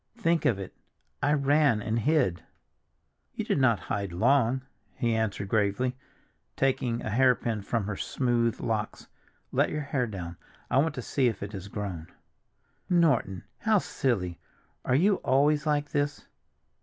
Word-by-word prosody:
"Think 170 -7 +1
of 110 - +3
it! 95 -2 -8 0.5
I 145 - +3
ran 140 -4 +3
and 110 +2 -1
hid." 130 - +1 0.9
"You - - -3
did - - +1
not 120 -5 +3
hide 100 -2 -3
long," 125 +6 +2 0.3
he 115 -2 0
answered 110 -3 -1
gravely, 110 +5 +1 0.6
taking 125 -3 0
a 110 - -3
hairpin 120 -2 +2
from 115 +2 -1
her 105 0 -3
smooth 120 0 0
locks. 110 -2 -3 0.4
"Let - - +2
your 150 - -3
hair 135 -3 -1
down, 90 -5 -6 0.3
I 130 - +4
want 155 +1 +1
to 125 - -5
see 130 +1 +1
if 110 -4 -2
it 100 - -6
has 95 -1 -6
grown." 95 -6 -5 0.8
"Norton! 140 - +2 0.2
how 220 -1 +3
silly. 100 - -1 0.4
Are 125 - +1
you 190 +7 +4
always 145 +3 +2
like 145 -1 +1
this?" 145 0 -1
120 Hz, 150 wpm, -28 LUFS, 105-145 Hz, 0.9 s, I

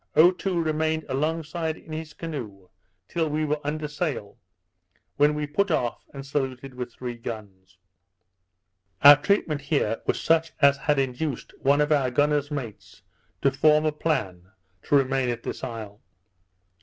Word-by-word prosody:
Otoo 180 +3 +4
remained 160 -1 0
alongside 160 +3 -2
in - - -14
his 155 0 -6
canoe 110 - -7 0.4
till 165 -2 -1
we 155 +1 0
were 150 0 -1
under 150 +1 -3
sail, 150 - -4 0.8
when 145 +1 +4
we 150 0 -2
put 175 +8 0
off, 120 -1 -1
and 140 - -7
was 135 - -11
saluted 135 -2 -3
with 125 -1 -6
three 125 +1 -6
guns. 100 -6 -9 1.3
Our 145 +1 +12
treatment 155 -4 +1
here 135 -6 0
was - - +1
such 165 0 +2
as 140 -2 +6
had 145 +1 0
induced 135 +1 -2
one 140 +2 +3
of 150 +1 +1
our 140 -4 +3
gunner's 145 +2 +1
mates 135 -8 -7 0.4
to 140 - +4
form 150 +3 +4
a 155 - +2
plan 95 - -2 0.4
to - - +2
remain 135 -2 +2
at 120 -1 -3
this - - -6
isle. 110 -4 -7
145 Hz, 155 wpm, -25 LUFS, 125-155 Hz, 1.3 s, Our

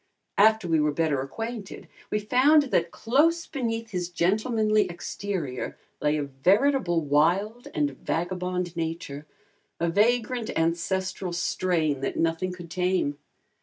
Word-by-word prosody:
After 220 -2 +5
we 165 -1 +3
were 150 0 +2
better 145 -3 0
acquainted 225 - -6 0.2
we - - 0
found 260 +8 +4
that 170 0 +2
close 315 - +2
beneath 230 -5 -3
his 180 -2 -2
gentlemanly 215 +3 +1
exterior 175 -6 -4 0.2
lay 150 +1 +2
a 150 - -1
veritable 175 - +2
wild 180 +11 +1
and 145 -1 +1
vagabond 180 0 -2
nature, 160 -3 -4 0.5
a 170 - +1
vagrant 235 +3 +1
ancestral 175 +2 -1
strain 170 -4 0
that 135 - -2
nothing 165 +3 0
could 175 -2 -10
tame. 180 -6 0
180 Hz, 125 wpm, -26 LUFS, 165-220 Hz, 0.5 s, After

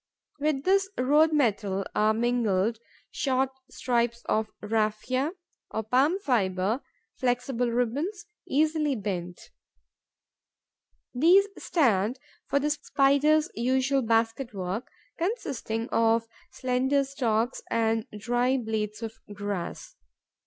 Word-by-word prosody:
With 290 -2 0
this 390 +1 +3
road 300 +5 +4
metal 205 -9 +1
are 215 +1 +3
mingled 225 -2 +1 0.3
short 265 -1 0 0.2
strips 235 -1 -1
of 215 0 0
raphia, 225 - 0 0.4
or 220 - -3
palm 265 - +3
fibre, 215 - 0 0.4
flexible 245 -1 0
ribbons, 280 - -1 0.2
easily 305 0 +2
bent. 180 -5 -5 1.6
These 355 +10 +5
stand 235 - +2 0.3
for - - +1
the 295 +2 0
Spider's 295 +1 +2
usual 260 +3 +1
basket 225 +1 0
work, 190 +5 -4 0.3
consisting 275 - -2
of 230 0 +2 0.2
slender 260 +2 +1
stalks 245 -3 -1
and 225 -1 +1
dry 245 +4 +1
blades 220 -2 -3
of 225 -1 -4 0.2
grass. 205 -3 -5
245 Hz, 100 wpm, -27 LUFS, 220-275 Hz, 1.6 s, These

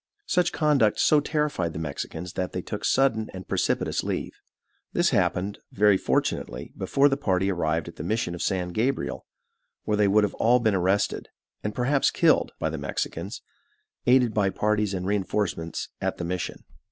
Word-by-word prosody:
Such 180 - +2
conduct 145 -9 +2
so 150 - +5
terrified 150 - -1
the - - -6
Mexicans 80 +3 -5
that 90 - -3
they 90 - -3
took 105 - -5
sudden 115 -5 +2
and 95 - -8
precipitous - - 0
leave. - - -3 0.6
This - - +2
happened, 100 +3 0
very 105 0 +4
fortunately, - - -1
before 140 +1 +3
the 135 -1 +1
party 95 -7 +1
arrived 80 -3 -1
at - - -10
the - - -5
mission 100 -1 -1
of 85 - -6
San 90 -2 -1
Gabriel, 120 +9 -2 0.6
where 105 - 0
they 105 -1 +4
would 105 +2 +4
all 120 +2 +4
have 120 - -4
been 110 -2 +3
arrested, 95 +2 0 0.3
and 105 0 -3
perhaps 135 +3 +2
killed, - - +3
by 80 - -1
the 80 - -4
Mexicans, 70 - -4 0.6
aided 125 -2 +5
by 100 -2 +2
parties 105 0 0
and 90 0 -3
reinforcements 95 -4 -2
at - - -1
the 85 - -4
mission. 90 0 -4
105 Hz, 170 wpm, -26 LUFS, 90-120 Hz, 0.6 s, so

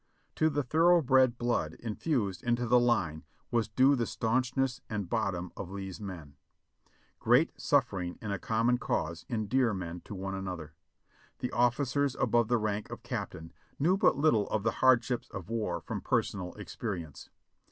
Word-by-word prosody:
To 155 - +4
the 145 -1 -1
thoroughbred 135 -5 +4
blood 120 0 -1
in 115 -2 -5
fused 105 - -1
into 120 0 0
the 125 +1 +5
line 90 -11 +1 0.3
was 115 -2 +1
due 135 +2 +4
the 120 -4 -1
staunchness 130 +2 0
and 105 -4 -3
bottom 95 -5 -1
of 90 - -6
Lee's 95 0 -6
men. 85 -8 -8 0.8
Great - - +3
sufTering 90 -2 0
in 105 - -5
a 100 - -2
common 115 +4 +1
cause 85 0 -2
endear 115 0 +1
men 90 -2 -5
to 105 - -7
one 95 +1 -4
another. 90 -5 -5 0.6
The 125 - -3
officers 125 +3 +1
above 120 -1 +2
the 120 - +3
rank 105 -1 -2
of - - -8
captain 80 +1 -5 0.2
knew 175 +6 +3
but 195 - +3
little 140 -9 +3
of 110 - -1
the 115 - +2
hardships 125 -1 +3
of 95 0 -8
war 115 -2 -1
from - - -5
personal 90 -3 -1
experience. 95 - -6
115 Hz, 160 wpm, -30 LUFS, 95-125 Hz, 0.8 s, the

